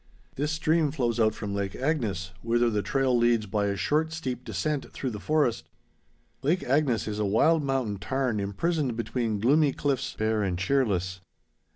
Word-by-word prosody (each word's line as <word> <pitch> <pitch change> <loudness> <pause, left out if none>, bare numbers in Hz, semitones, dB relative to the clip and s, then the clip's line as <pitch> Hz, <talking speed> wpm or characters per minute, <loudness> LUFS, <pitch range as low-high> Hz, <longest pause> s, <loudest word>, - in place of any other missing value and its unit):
This 145 +3 -1
stream 155 0 +2
flows 120 -5 -1
out 110 -1 +3
from 105 -2 -4
Lake 100 -1 -2
Agnes, 110 - -1
whither 120 0 +2
the 105 -1 0
trail 135 +2 +1
leads 120 -2 +3
by 100 +1 0
a 100 - 0
short 155 +6 +1
steep 130 -6 -4
descent 150 -2 -2
through 130 - -4
the 105 - -6
forest. 150 -3 0 0.7
Lake 165 +7 +1
Agnes 135 -4 +1
is 105 -1 -3
a - - +1
wild 155 +11 +3
mountain 135 -7 -1
tarn 125 0 -1
imprisoned 125 - -1
between 115 -2 -1
gloomy 140 +5 +3
cliffs, 135 -2 -1
bare 110 0 +1
and 95 -3 -1
cheerless. 95 -4 0
120 Hz, 170 wpm, -27 LUFS, 105-145 Hz, 0.7 s, out